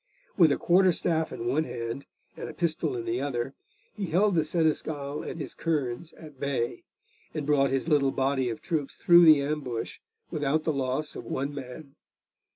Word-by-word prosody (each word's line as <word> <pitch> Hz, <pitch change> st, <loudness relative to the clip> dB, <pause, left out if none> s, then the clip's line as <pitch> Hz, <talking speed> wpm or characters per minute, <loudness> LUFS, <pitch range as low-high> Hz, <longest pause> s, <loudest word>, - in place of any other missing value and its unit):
With 165 Hz, -6 st, +6 dB
a -, -, +2 dB
quarter 185 Hz, +1 st, +4 dB
staff 160 Hz, -1 st, 0 dB
in 115 Hz, -, -5 dB
one 135 Hz, +6 st, +2 dB
hand 115 Hz, +2 st, -5 dB, 0.3 s
and -, -, -6 dB
a 155 Hz, -, -9 dB
pistol 160 Hz, -5 st, -1 dB
in 115 Hz, -, -4 dB
the 115 Hz, +2 st, -1 dB
other, 135 Hz, -2 st, -2 dB, 0.4 s
he 200 Hz, -3 st, -4 dB
held 190 Hz, +5 st, +3 dB
the 160 Hz, -3 st, +3 dB
Seneschal 155 Hz, -2 st, -1 dB
and -, -, -6 dB
his 150 Hz, -, -5 dB
kerns 155 Hz, -1 st, -2 dB
at 150 Hz, -4 st, -13 dB
bay, 130 Hz, -4 st, -1 dB, 0.5 s
and 150 Hz, -, -2 dB
brought 140 Hz, -2 st, +3 dB
his 135 Hz, +3 st, -1 dB
little 145 Hz, -4 st, +3 dB
body 135 Hz, -1 st, 0 dB
of 115 Hz, -, -6 dB
troops 155 Hz, -5 st, -2 dB
through 175 Hz, 0 st, +7 dB
the 155 Hz, -3 st, +7 dB
ambush 140 Hz, -6 st, -3 dB, 0.3 s
without 150 Hz, +1 st, 0 dB
the 160 Hz, -, 0 dB
loss 135 Hz, +3 st, -2 dB
of -, -, -7 dB
one 140 Hz, +2 st, -3 dB
man. 135 Hz, +1 st, -8 dB
145 Hz, 180 wpm, -28 LUFS, 135-160 Hz, 0.5 s, through